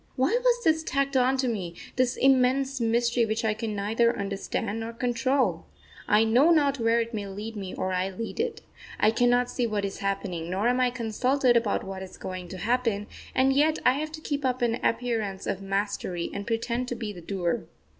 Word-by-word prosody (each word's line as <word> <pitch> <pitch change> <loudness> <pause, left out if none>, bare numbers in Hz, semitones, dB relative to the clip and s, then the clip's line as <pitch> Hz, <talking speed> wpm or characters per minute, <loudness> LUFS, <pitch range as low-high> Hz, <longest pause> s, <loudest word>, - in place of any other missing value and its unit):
Why 270 - +2
was 485 -1 +3
this 320 0 +3
tacked 275 -2 -1
on 260 +1 +3
to 260 -1 0
me 185 -7 -3 0.2
this 255 0 +1
immense 265 0 +3
mystery 235 +1 +2
which 220 0 -1
I 215 - +2
can 220 -1 -4
neither 225 +4 +1
understand 200 +2 -3
nor 225 +1 -5
control? 250 +3 0 0.4
I 210 +1 +5
know 245 +8 +4
not 285 -5 +3
where 230 0 +3
it 230 0 -3
may 205 -2 -3
lead 210 +3 -6
me 195 -3 -6
or 185 0 -2
I 185 +1 0
lead 225 - -6
it. 465 0 -2 0.4
I 215 - +5
cannot 245 +1 +3
see 245 -1 -1
what 210 -2 -1
is 195 - -5
happening, 180 -4 -3
nor 195 +5 0
am 250 +1 +1
I 250 -1 +3
consulted 250 +2 +1
about 230 -3 +1
what 190 0 -6
is 190 - -9
going 185 -1 -6
to 185 - -8
happen, 225 0 0 0.3
and 265 +1 +4
yet 305 +3 +3
I 250 - +6
have 305 +3 -3
to 310 - -7
keep 290 -2 -3
up 255 -1 0
an 235 0 +1
appearance 225 -5 -1
of 195 - -2
mastery 195 -3 -2
and 200 0 -5
pretend 235 +2 -1
to 245 - -3
be 220 -3 -5
the 175 - -10
doer.... 175 -1 -2
230 Hz, 205 wpm, -27 LUFS, 200-255 Hz, 0.4 s, I